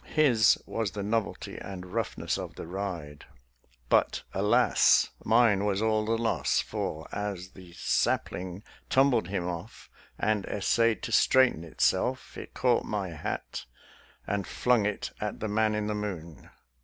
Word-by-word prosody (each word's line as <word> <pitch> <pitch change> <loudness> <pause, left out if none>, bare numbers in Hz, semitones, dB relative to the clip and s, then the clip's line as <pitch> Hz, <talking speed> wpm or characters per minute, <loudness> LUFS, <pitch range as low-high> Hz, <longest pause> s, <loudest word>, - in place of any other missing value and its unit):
His 125 -9 +5
was 115 -3 -2
the 100 - -4
novelty 110 +1 -2
and 95 -2 -7
roughness 115 -2 -2
of - - -6
the - - -7
ride, 85 -5 -5 0.6
but, - - +2
alas! 105 +6 +4
mine 110 -3 +4
was 100 -1 +1
all 110 0 +1
the 115 +1 +1
loss; 115 0 +1
for, 80 0 -4
as 100 -3 -4
the 90 -2 -14
sapling 90 +2 -1 0.3
tumbled 130 -7 +3
him 90 -2 -2
off, 85 -1 -7 0.3
and 105 -2 +1
essayed 115 +3 +1
to - - -4
straighten 130 -6 +4
itself, 80 - 0
it - - -9
caught 125 -2 +2
my 100 -3 -3
hat 80 -5 -5 0.6
and 100 -1 -2
flung 120 -4 +2
it 105 - -3
at 105 -1 -3
the 110 - -2
man 110 +1 +1
in 105 0 -1
the 105 - -1
moon. 90 -7 -6
105 Hz, 145 wpm, -28 LUFS, 95-115 Hz, 0.6 s, His